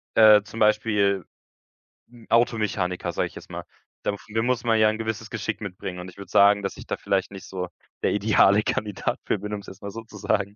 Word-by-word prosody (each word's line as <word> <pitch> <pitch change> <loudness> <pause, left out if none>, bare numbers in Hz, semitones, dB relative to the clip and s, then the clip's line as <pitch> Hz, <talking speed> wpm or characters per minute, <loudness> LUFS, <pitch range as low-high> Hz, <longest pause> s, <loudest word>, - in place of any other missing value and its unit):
äh, 110 -2 +8
zum 110 +2 -9
Beispiel, 105 -3 +2 0.8
hm, 120 -2 -17
Automechaniker, 105 -7 +1
sage - - -1
ich - - -16
jetzt - - -11
mal. - - -5 0.4
Dafür 110 +2 -2
muss 125 -1 0
man 115 -2 +3
ja 110 0 +6
‘n 110 - -2
gewisses 110 -1 -4
Geschick 110 - -4
mitbringen 95 -2 -6
und 90 +1 -7
ich 90 - -16
würde 100 -2 -10
sagen, 100 +1 +5
dass 95 - -4
ich - - -10
da - - -1
vielleicht 95 0 -1
nicht 95 -2 -9
so 90 -1 -4 0.4
der - - +2
deale 105 -1 +5
Kandidat 105 -2 -2
für - - 0
bin, 105 +2 -5
um 105 - -4
es 100 - -16
jetzt 95 - -11
mal 100 - -5
so 115 +2 -7
zu 110 -1 -13
sagen 100 0 -1
105 Hz, 220 wpm, -25 LUFS, 100-110 Hz, 0.8 s, äh